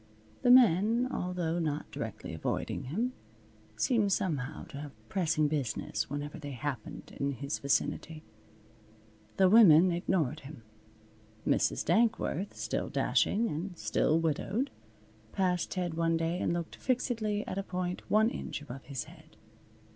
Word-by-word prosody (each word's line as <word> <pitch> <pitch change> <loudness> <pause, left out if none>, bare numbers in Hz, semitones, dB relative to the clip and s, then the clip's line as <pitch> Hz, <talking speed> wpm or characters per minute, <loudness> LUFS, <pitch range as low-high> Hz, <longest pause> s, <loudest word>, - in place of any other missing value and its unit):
The - - +2
men, 235 0 +6
although 175 -2 -2
not 155 -3 -2
directly - - -6
avoiding - - -3
him, 225 - -1 0.6
seemed 205 - +2
somehow 155 -9 -1
to 140 -4 -7
have 110 -7 -11
pressing 165 -5 +1
business 145 -7 -2
whenever 145 +3 -5
they 145 -2 -6
happened 130 -2 -5
in 140 0 0
his 140 +3 -4
vicinity. 155 +3 -1 1.1
The 190 - +6
women 185 -4 +7
ignored 170 -4 0
him. 135 -4 -11 0.8
Mrs. - - +2
Dankworth, 220 -5 +1
still - - -2
dashing 230 +3 +2
and 175 +1 -4
still 160 0 +2
widowed, 190 - -1 0.6
passed 180 -2 +1
Ted 180 -3 -2
one 165 0 +1
day 165 +2 -1
and - - 0
looked 170 -1 -3
fixedly 230 -5 -1
at 190 - -3
a - - -2
point 180 -1 -3
one 220 +2 +4
inch - - -5
above 135 -2 -9
his 135 -5 -4
head. 160 +1 -17
165 Hz, 135 wpm, -31 LUFS, 145-200 Hz, 1.1 s, women